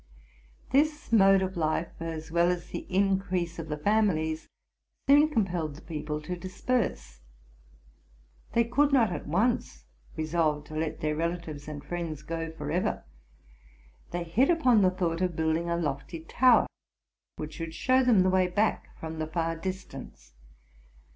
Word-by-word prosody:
This 300 +2 +1
mode 195 -3 +6
of 190 0 -3
life, 160 0 0
as 160 -1 -5
well 170 +1 +3
as 175 -1 -2
the - - -5
increase 185 -3 0
of 160 -1 -6
the 150 - -2
families, 160 -4 +1 0.6
soon 290 +2 +6
compelled 180 - -1
the 155 - -13
people 150 -1 -4
to 180 +3 -4
disperse. 185 - -2 1.3
They 235 - +4
could 280 +5 +2
not 235 -7 +4
at - - -5
once 175 - 0 0.3
resolve 155 -2 0
to 155 - -10
let 155 0 -2
their 150 0 0
relatives 165 -3 -3
and 145 -2 -6
friends 165 -4 -4
go 165 +1 -4
forever: 160 +3 -2 1.1
they 175 0 -3
hit 200 +11 +2
upon 255 -10 +4
the 185 - +5
thought 180 -2 -1
of 180 -2 0
building 160 +2 0
a 170 - +1
lofty 160 +1 -3
tow 245 +9 +5
er, - - -5 0.7
which 155 0 -6
should 165 0 -6
show 260 0 +3
them 235 -6 +5
the 185 - +2
way 185 -1 +3
back 205 +4 -1
from 160 0 -6
the 155 - -2
far 165 0 -1
distance. 165 - -7
170 Hz, 155 wpm, -28 LUFS, 160-195 Hz, 1.3 s, mode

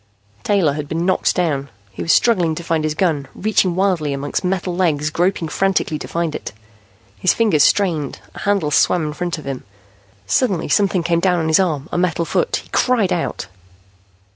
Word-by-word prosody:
Taylor 190 -8 +2
had 150 0 -5
been 165 +2 -1
knocked 185 - +1
down. 145 -6 -1 0.2
He 95 - -8
was 85 - +1
struggling 180 -9 +3
to 170 - -6
find 165 -2 0
his 155 0 -1
gun, 155 -6 0
reaching 190 -4 +1
wildly 180 -6 +1
among 140 +1 -5
metal 180 -1 -1
legs, 155 -5 0
groping 175 0 0
frantically 185 -3 0
to - - -7
find 170 -2 -2
it. - - -6 0.7
His 185 - +2
fingers 205 -11 +3
strained, 165 -8 +1
a - - -10
handle 200 -7 0
swam 160 +3 +3
in 150 - -4
front 175 +1 -3
of 155 - -10
him. 135 -2 -5 0.6
Suddenly 180 - 0
something 195 -4 +2
came 170 0 +1
down 180 0 +2
on 160 -1 -1
his 160 - +4
arm, 160 -6 0
a - - -1
metal 170 -2 0
foot. 480 - 0
He - - -21
cried 225 -8 +2
out. 175 - -3
170 Hz, 190 wpm, -19 LUFS, 155-185 Hz, 0.7 s, his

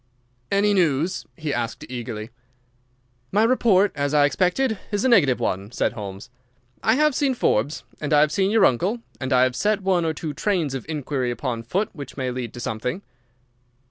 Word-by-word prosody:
"Any 205 +1 +3
news?" 170 -1 +1
he 155 -3 -3
asked, 120 -1 -3
eagerly. 115 -2 -6 1.0
"My 210 +3 +3
report, 220 -5 +4
as 145 0 -1
I 145 -1 +6
expected, 190 - +1
is 205 +3 0
a - - +5
negative 165 - +4
one," 95 +3 -2
said - - 0
Holmes. 100 +3 -8 0.5
"I 220 - +3
have 300 +1 +3
seen 270 -1 +1
Forbes, 145 - 0 0.2
and 150 - -4
I 150 -1 +6
have 150 0 +3
seen 190 +3 +1
your 220 -1 +5
uncle, 190 - +1 0.2
and 130 0 -4
I 125 -1 +5
have 130 -1 +1
set 210 -1 0
one 185 -2 +2
or 160 -1 -1
two 155 0 -4
trains 170 -4 0
of 135 +2 -6
inquiry 140 -4 -2
upon 120 -1 -3
foot 190 - -1
which 145 -5 -9
may 130 -2 -2
lead 125 -2 -4
to - - -7
something." 120 - -3
150 Hz, 185 wpm, -23 LUFS, 125-200 Hz, 1.0 s, I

